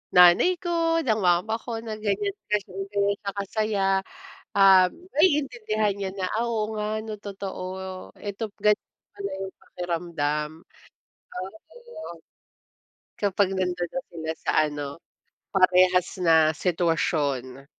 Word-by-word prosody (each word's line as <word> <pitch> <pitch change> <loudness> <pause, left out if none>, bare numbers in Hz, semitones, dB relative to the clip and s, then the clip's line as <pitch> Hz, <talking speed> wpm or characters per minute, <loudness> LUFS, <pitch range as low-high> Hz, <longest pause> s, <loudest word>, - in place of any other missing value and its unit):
nanay 180 - +7
ko, 335 -2 +1
ng 225 -9 +1
mama 180 +3 +2
ko, 230 -2 -4
na 225 -1 -5
ganiyan 205 -1 -1 0.2
kasi 210 -1 0 0.2
gano'n 200 0 +1
siya 200 - -2
kasaya." 200 0 0 0.7
Um, 190 -2 +7 0.2
maiintindihan 245 - +2
niya 195 -1 -2
na, 190 -2 -1
"Ah, 230 +2 0
oo 220 -2 -1
nga, 215 +1 -2
'no, 220 -1 -5
totoo. 195 -2 -6 0.4
Ito 205 +2 -5
ganiyan 210 0 +2 0.3
pala 200 -1 -4
'yong 190 0 -5
pakiramdam." 165 -4 -2 0.9
Oh, 185 +2 -5 0.2
ayun. 475 - -10 1.0
Kapag 200 -1 +2
nando'n 180 -2 -1
na 265 - -3
sila 160 -1 -4
sa - - -2 0.2
ano, 145 -1 -4 0.7
parehas 185 -1 +4
na 160 -3 +5
sitwasyon. 150 -6 0
195 Hz, 120 wpm, -26 LUFS, 175-215 Hz, 1.0 s, nanay